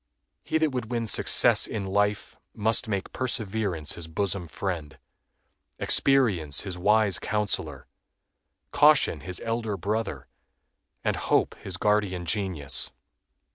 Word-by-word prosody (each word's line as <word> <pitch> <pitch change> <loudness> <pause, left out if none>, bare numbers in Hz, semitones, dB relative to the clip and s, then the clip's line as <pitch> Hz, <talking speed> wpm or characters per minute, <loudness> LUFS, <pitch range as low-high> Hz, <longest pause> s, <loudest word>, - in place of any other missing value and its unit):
He - - 0
that 160 -2 +1
would 125 -4 -4
win 120 -2 -2
success 110 - +5
in 105 -3 -4
life 100 +2 -1 0.2
must 110 +3 0
make 100 -3 -3
Perseverance 105 - -2
his 85 -2 -7
bosom 90 +1 -2
friend, 85 -3 -5 0.8
Experience 100 - +2
his 95 -3 -5
wise 105 +1 +2
counselor, 100 -10 -2 0.9
Caution 145 - +4
his 90 +4 -5
elder 115 -3 -2
brother, 100 - -3 0.8
and - - 0
Hope - - +1
his 95 -1 -6
guardian 100 -3 0
genius. 85 - +1
100 Hz, 115 wpm, -26 LUFS, 90-110 Hz, 0.9 s, success